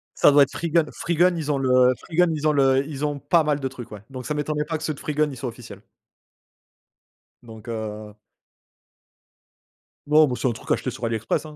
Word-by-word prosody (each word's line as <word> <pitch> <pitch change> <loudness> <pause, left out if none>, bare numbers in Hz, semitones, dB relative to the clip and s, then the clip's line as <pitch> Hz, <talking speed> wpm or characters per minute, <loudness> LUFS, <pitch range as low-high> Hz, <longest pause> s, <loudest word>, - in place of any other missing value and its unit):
Ça - - +5
doit 145 0 +7
être 140 - -3
Freegun. 170 -1 +1
Freegun 175 +1 +1
ils 155 -3 -2
ont 140 - 0
le 130 -1 +4
Freegun 175 +1 +1
ils 155 0 -1
ont - - +4
le 135 -1 +3
ils 150 -1 -4
ont 145 -1 -3
pas 165 +4 +2
mal 150 -1 0
de 135 - -2
trucs, 125 -3 -10
ouais, 105 -2 -9
donc 130 -2 -8
ça 150 - -2
m'étonnerait 150 0 -2
pas 160 0 -3
que 155 - -10
ceux 155 -1 -1
de - - -13
Freegun, 150 0 0
ils 135 - -9
soient 125 0 -4
officiels 115 -4 -12 1.6
donc 110 0 -13
heu 110 -2 -6 1.9
Non, 150 0 +5
bah, 125 - -2
c'est - - 0
un - - +1
truc 115 - -7
acheté - - 0
sur 125 0 -10
AliExpress, 115 +6 -2
hein, 155 -1 -10
140 Hz, 215 wpm, -23 LUFS, 125-155 Hz, 1.9 s, doit